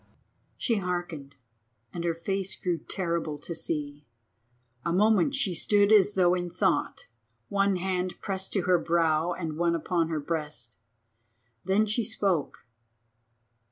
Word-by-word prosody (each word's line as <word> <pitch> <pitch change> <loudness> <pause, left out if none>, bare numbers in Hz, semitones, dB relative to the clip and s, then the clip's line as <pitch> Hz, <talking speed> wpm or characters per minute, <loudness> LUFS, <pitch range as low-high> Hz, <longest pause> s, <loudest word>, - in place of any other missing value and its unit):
She 230 -3 +1
hearkened, 175 -7 -4 0.6
and 170 - -4
her 170 -1 0
face 190 +3 -2
grew 175 -3 -1
terrible 170 -2 -2
to 160 +4 -6
see. 150 -3 -4 0.8
A 170 - -1
moment 210 +7 +3
she 205 -9 +1
stood 205 +4 +3
as 205 -1 +5
though 180 -2 +4
in 175 -1 -2
thought, - - 0 0.4
one 200 -1 +2
hand 185 0 -2
pressed 190 -1 -3
to 195 - +1
her 180 -1 +3
brow 165 0 +1
and 160 -3 -5
one 170 0 +2
upon 165 0 0
her 160 -2 -1
breast. 150 -7 -4 0.9
Then 195 +4 +3
she 215 +3 0
spoke. 195 - -1
175 Hz, 135 wpm, -28 LUFS, 165-195 Hz, 0.9 s, as